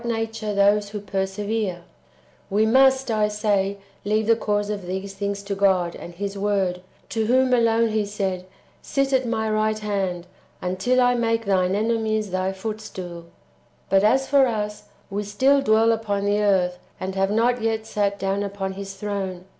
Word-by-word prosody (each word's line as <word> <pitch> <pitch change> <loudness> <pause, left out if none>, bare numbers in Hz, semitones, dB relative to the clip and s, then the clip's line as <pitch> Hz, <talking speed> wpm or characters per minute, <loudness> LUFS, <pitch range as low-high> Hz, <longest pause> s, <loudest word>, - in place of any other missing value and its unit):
nature 225 -2 -2
those 200 +1 +3
who 210 0 -5
persevere, 195 -1 -2 0.3
— - - -33
[we 210 +2 +2
must, 265 +2 +4
I 215 -1 +2
say, 205 -2 0 0.3
leave 215 +2 +1
the 230 +1 +4
cause 205 -2 -1
of 200 -4 -5
these 190 +2 -4
things] 200 0 -3
to 200 0 -3
God 190 -3 +2
and 175 - -10
His 200 +2 -4
Word, 195 -3 0 0.3
to 220 -1 -1
whom 255 +1 +3
alone 230 -1 +3
He 215 -1 +1
said, 190 -3 -3 0.2
" - - -32
Sit 275 0 -1
at 260 -2 +2
my 220 -1 -1
right 215 0 +1
hand, 195 -4 -2 0.3
until 190 +8 0
I 245 0 +4
make 230 -1 0
Thine 190 -1 +2
enemies 220 -1 0
Thy 185 +1 0
footstool."^ 190 -4 -6 0.7
But 195 0 +5
as 265 +5 +3
for 275 -1 +5
us, 210 -2 -3 0.3
we 200 +1 -1
still 260 +8 +3
dwell 225 -2 +4
upon 205 -3 -1
the 205 +1 +2
earth, 180 -3 +2 0.2
and 190 +1 -4
have 195 0 +1
not 235 +3 +2
yet 220 -1 -1
sat 200 -2 -1
down 195 +1 -1
upon 200 -1 -3
His 195 0 -7
throne. 195 -3 -4
205 Hz, 175 wpm, -23 LUFS, 195-225 Hz, 0.7 s, But